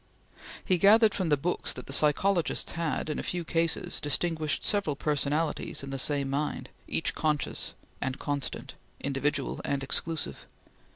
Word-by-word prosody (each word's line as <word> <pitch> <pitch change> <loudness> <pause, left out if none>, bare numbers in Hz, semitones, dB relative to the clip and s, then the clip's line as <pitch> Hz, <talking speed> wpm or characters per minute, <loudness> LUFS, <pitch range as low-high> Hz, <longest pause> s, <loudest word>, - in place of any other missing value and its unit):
He 185 -2 +2
gathered 215 +2 +6
from 185 -4 -1
the 145 - +4
books 170 +6 -1
that 125 - -8
the 135 - -6
psychologists 165 +5 +2
had, 165 -3 -2
in 150 - -2
a - - -1
few 175 -1 -3
cases, 165 0 0
distinguished 155 0 0
several 200 -9 +2
personalities 150 +1 0
in 135 - -6
the 135 - -1
same 140 0 +2
mind, 140 +2 -2 0.2
each - - +1
conscious 150 -2 -1 0.3
and 130 -1 -2
constant, 145 -2 -3 0.3
individual 140 0 -1
and 140 -1 -1
exclusive. 160 +3 -2
150 Hz, 150 wpm, -29 LUFS, 140-170 Hz, 0.3 s, gathered